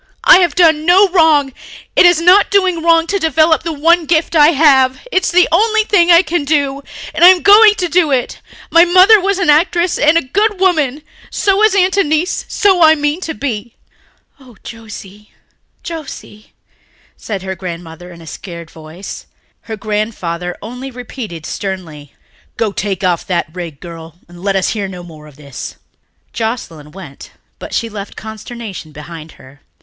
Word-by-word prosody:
I -, -, +7 dB
have 345 Hz, -5 st, 0 dB
done 320 Hz, -4 st, +3 dB
no 380 Hz, +3 st, +5 dB
wrong... 315 Hz, -6 st, +2 dB, 0.4 s
it 360 Hz, -, +6 dB
is 350 Hz, -2 st, +3 dB
not 365 Hz, +4 st, +4 dB
doing 375 Hz, -4 st, +1 dB
wrong 330 Hz, 0 st, +3 dB
to 400 Hz, +3 st, -2 dB
develop 320 Hz, 0 st, +2 dB
the 330 Hz, +1 st, -5 dB
one 325 Hz, +2 st, +1 dB
gift 330 Hz, +1 st, 0 dB
I 295 Hz, -1 st, +6 dB
have. 270 Hz, -4 st, +3 dB
It's 375 Hz, -4 st, 0 dB
the 360 Hz, +1 st, +3 dB
only 435 Hz, +5 st, +2 dB
thing 365 Hz, -5 st, +2 dB
I 340 Hz, +1 st, +6 dB
can 345 Hz, -4 st, -2 dB
do... 280 Hz, -2 st, -1 dB, 0.3 s
and 315 Hz, +2 st, 0 dB
I -, -, +10 dB
am 365 Hz, -1 st, +5 dB
going 415 Hz, +1 st, +6 dB
to 365 Hz, -4 st, -2 dB
do 340 Hz, -2 st, +1 dB
it. 255 Hz, -2 st, -2 dB, 0.3 s
My 335 Hz, +1 st, +6 dB
mother 375 Hz, +4 st, +5 dB
was 395 Hz, 0 st, -1 dB
an 360 Hz, -6 st, +2 dB
actress 345 Hz, +3 st, +1 dB
and 305 Hz, +2 st, +3 dB
a -, -, 0 dB
good 405 Hz, +9 st, -1 dB
woman. 310 Hz, -7 st, 0 dB, 0.3 s
So 395 Hz, 0 st, 0 dB
is 435 Hz, -2 st, +3 dB
Aunt 380 Hz, 0 st, +1 dB
Annice. 315 Hz, -1 st, -1 dB
So 385 Hz, -4 st, +1 dB
I 315 Hz, 0 st, +6 dB
mean 295 Hz, +3 st, -2 dB
to 320 Hz, -3 st, -5 dB
be." 235 Hz, -4 st, -5 dB, 0.6 s
"Oh, 250 Hz, -5 st, -18 dB
Josie, 210 Hz, -2 st, -12 dB, 0.5 s
Josie," 290 Hz, -9 st, -10 dB, 0.6 s
said 200 Hz, -4 st, -7 dB
her 190 Hz, 0 st, -5 dB
grandmother 175 Hz, -1 st, -9 dB
in 170 Hz, -1 st, -14 dB
a -, -, -14 dB
scared 170 Hz, 0 st, -10 dB
voice. 160 Hz, +4 st, -11 dB, 0.4 s
Her 220 Hz, -, -5 dB
grandfather 200 Hz, -5 st, -4 dB
only 250 Hz, +5 st, -8 dB
repeated 235 Hz, -, -9 dB
sternly, 165 Hz, -8 st, -7 dB, 0.4 s
"Go, 220 Hz, -3 st, -1 dB
take 195 Hz, -2 st, -4 dB
that 175 Hz, -2 st, -2 dB
rig 175 Hz, -4 st, -7 dB
off, -, -, -37 dB
girl, 165 Hz, -2 st, -11 dB
and 175 Hz, 0 st, -15 dB
let 195 Hz, 0 st, -2 dB
us 190 Hz, -, 0 dB
hear 205 Hz, -3 st, -3 dB
no 180 Hz, -2 st, -10 dB
more 155 Hz, -3 st, -14 dB
of 150 Hz, -, -17 dB
this." 140 Hz, -3 st, -9 dB, 0.6 s
Joscelyn 170 Hz, -10 st, -5 dB
went 165 Hz, -7 st, -13 dB, 0.3 s
but -, -, -9 dB
she 230 Hz, -, -2 dB
left 205 Hz, -2 st, -9 dB
consternation 220 Hz, -5 st, -9 dB
behind 155 Hz, +2 st, -11 dB
her. 135 Hz, +2 st, -19 dB
270 Hz, 175 wpm, -14 LUFS, -, 0.6 s, I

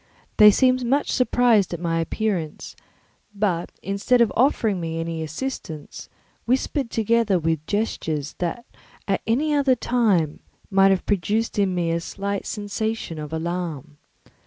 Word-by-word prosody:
They 210 Hz, 0 st, +9 dB
seemed 255 Hz, +4 st, +3 dB
much 275 Hz, +4 st, +1 dB
surprised 245 Hz, -7 st, +3 dB
at -, -, -8 dB
my 165 Hz, -1 st, -1 dB
appearance, 170 Hz, -3 st, -3 dB, 0.6 s
but 190 Hz, -4 st, -1 dB
instead 200 Hz, +6 st, +1 dB
of 235 Hz, -2 st, +3 dB
offering 225 Hz, -6 st, +2 dB
me 165 Hz, 0 st, -3 dB
any 165 Hz, 0 st, -3 dB
assistance, 160 Hz, -, -6 dB, 0.4 s
whispered 260 Hz, +1 st, 0 dB
together 225 Hz, -3 st, +2 dB
with 160 Hz, -2 st, -1 dB
gestures 160 Hz, -9 st, -2 dB
that 180 Hz, +7 st, -3 dB, 0.4 s
at 195 Hz, -, 0 dB
any 290 Hz, +7 st, +1 dB
other 280 Hz, -3 st, +3 dB
time 210 Hz, -11 st, +1 dB, 0.3 s
might 195 Hz, 0 st, +5 dB
have 190 Hz, -1 st, +1 dB
produced 210 Hz, +3 st, 0 dB
in 190 Hz, -2 st, +1 dB
me 170 Hz, -2 st, 0 dB
a 165 Hz, -, 0 dB
slight 200 Hz, +3 st, -4 dB
sensation 210 Hz, -4 st, -3 dB
of 150 Hz, 0 st, -6 dB
alarm. 160 Hz, -3 st, -4 dB
200 Hz, 135 wpm, -23 LUFS, 165-230 Hz, 0.6 s, They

